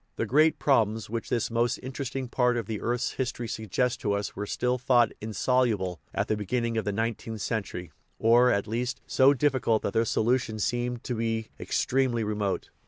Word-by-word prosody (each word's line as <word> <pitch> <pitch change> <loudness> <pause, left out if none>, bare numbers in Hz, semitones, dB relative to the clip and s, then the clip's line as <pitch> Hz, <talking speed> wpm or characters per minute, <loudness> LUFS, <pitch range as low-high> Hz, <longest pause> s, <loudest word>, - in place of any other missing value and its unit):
The - - -1
great 155 +4 +4
problems 110 -6 +1
which 115 -1 -3
this 120 -1 0
most 120 0 +1
interesting 130 0 -5
part 125 0 +1
of 115 - -2
the 110 0 -4
earth's 120 +2 -1
history 120 -2 -3
suggests 110 +3 -1
to 105 - -1
us 100 0 -3
were 105 +1 -4
still 125 +3 0
thought 120 -2 +4
insoluble 110 -5 0
at - - -1
the 110 - +1
beginning 115 +3 -1
of 110 - -1
the 105 - 0
nineteenth 110 0 -3
cen 110 +2 0
tury, 90 -4 -8 0.3
or, 120 +2 +5
at 100 -4 +1
least, 120 +4 -2
so 135 +2 +4
difficult 130 -5 +1
hat 100 - -2
their 115 +1 +2
solution 115 0 +1
seemed 120 +3 -1
to 125 - -3
be 115 -1 -2
extremely 125 -3 0
remote. 105 -2 -2
115 Hz, 185 wpm, -27 LUFS, 110-125 Hz, 0.3 s, or